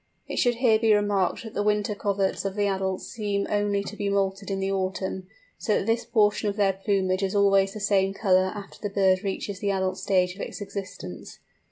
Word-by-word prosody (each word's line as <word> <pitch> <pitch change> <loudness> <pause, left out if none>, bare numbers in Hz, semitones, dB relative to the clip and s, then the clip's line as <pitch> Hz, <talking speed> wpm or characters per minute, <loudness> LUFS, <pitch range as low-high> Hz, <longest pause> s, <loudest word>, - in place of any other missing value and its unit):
It - - -5
should 245 -2 +3
here 230 -3 +3
be 220 -2 +4
remarked 205 -2 +1
that 225 - -9
the - - -1
wing 210 0 +2
coverts 200 -2 -1
of 195 -1 -3
the 205 -1 +1
adults 190 -1 -1
seem 205 -3 -2
only 205 -1 +1
to 205 - -7
be 205 -1 -2
moulted 200 0 -1
in 195 -1 -1
the 195 0 -1
autumn, 190 -1 -2 0.3
so 215 - +1
that - - -2
this 225 +1 0
portion 215 -2 +2
of 200 - -3
their 200 -2 +2
plumage 190 -1 0
is 195 0 -1
always 195 -1 +4
the - - -5
same 195 -1 +2
colour 190 -2 +2
after 200 -1 -9
the 205 - -2
bird 190 -1 +2
reaches 195 0 -3
the 200 - -1
adult 190 -1 -1
stage 180 -2 +1
of 200 - -9
its - - -6
existence. 185 - -7
200 Hz, 215 wpm, -26 LUFS, 190-205 Hz, 0.3 s, be